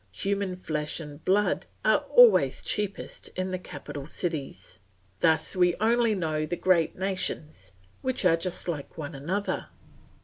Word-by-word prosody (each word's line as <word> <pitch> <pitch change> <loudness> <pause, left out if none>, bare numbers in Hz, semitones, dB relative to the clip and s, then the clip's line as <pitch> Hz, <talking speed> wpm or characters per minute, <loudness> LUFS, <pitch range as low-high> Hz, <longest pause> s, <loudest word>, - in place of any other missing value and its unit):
Human 195 - -1
flesh 155 -4 -3
and 150 -1 -9
blood 205 +3 +2 0.2
are - - +5
always - - +6
cheapest 205 -1 -3
in 185 0 -2
the 185 - -2
capital 145 -5 -8
cities. 150 - -5 0.4
Thus 160 +3 +2
we 180 -1 +3
only 230 +1 +2
know 155 -4 -1
the 175 - -2
great 175 -3 +2
nations, 160 - -3 0.3
which 260 -6 -1
are 170 -2 +6
just 175 +2 -4
like 155 -3 -4
one 155 -1 -5
another. 175 +9 -2
180 Hz, 140 wpm, -27 LUFS, 155-195 Hz, 0.4 s, always